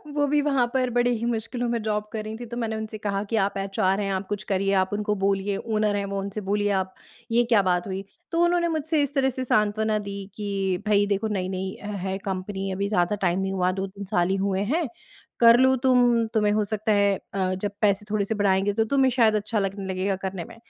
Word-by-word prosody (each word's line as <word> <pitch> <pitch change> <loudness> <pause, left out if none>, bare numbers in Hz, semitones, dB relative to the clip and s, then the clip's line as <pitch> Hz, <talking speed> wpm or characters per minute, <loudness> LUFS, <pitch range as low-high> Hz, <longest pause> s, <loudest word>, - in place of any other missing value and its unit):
वो 290 -1 +2
भी 295 +1 +2
वहाँ 275 -4 +2
पर 255 -1 +1
बड़े 245 0 +2
ही 235 -1 -1
मुश्किलों 240 +1 -2
में 235 -1 -1
जॉब 210 -1 -1
कर 215 -1 -3
रही 215 +1 -6
थीं, 240 - -7
तो 235 +1 -6
मैंने 225 -2 -2
उनसे 220 0 -5
कहा 200 -1 -2
कि, 210 +2 -3
"आप 200 -2 +1
एचआर 195 0 0
हैं, 200 -1 -1
आप 190 0 -3
कुछ 205 -1 -3
करिए, 195 +1 +1
आप 190 -1 +2
उनको 210 0 0
बोलिए 195 0 0
ओनर 215 -2 0
हैं 200 0 -1
वो, 200 0 -3
उनसे 200 +2 -4
बोलिए 205 0 +1
आप 190 0 -7 0.4
ये 235 +1 +4
क्या 230 -3 +4
बात 180 -1 0
हुई?" 190 0 -4 0.3
तो 335 +1 +2
उन्होंने 345 0 +2
मुझसे 315 -1 0
इस 285 - -3
तरह 265 -1 +3
से 260 0 -3
सांत्वना 215 -2 +1
दी 200 -1 -6
कि, 195 -3 -2
"भई 205 -1 +4
देखो 205 +2 0
नई-नई 190 -2 -3 0.3
है 190 0 -1
कंपनी 195 0 -3
अभी 195 +2 -1
ज़्यादा 180 -1 +1
टाइम 175 +2 +1
नहीं 190 0 -1
हुआ 185 -1 +1
2-3 195 +1 -6
साल 175 -1 +1
ही 190 - +2
हुए 190 -1 0
हैं, 330 -2 +1 0.5
कर 235 0 +8
लो 260 0 +5
तुम 245 -3 +4
तुम्हें 210 -2 +3
हो 215 0 +2
सकता 215 +1 -1
है 200 -1 +3 0.2
अ, 190 -1 0
जब 200 +2 -3
पैसे 205 -1 +2
थोड़े 210 -2 +1
से 220 - -2
बढ़ाएँगे 200 0 +2
तो 225 +2 +2
तुम्हें 270 -2 +4
शायद 230 -3 +3
अच्छा 215 +1 -1
लगने 195 0 -3
लगेगा 190 +1 0
करने 190 -3 -4
में।" - - -13
205 Hz, 235 wpm, -25 LUFS, 195-230 Hz, 0.5 s, कर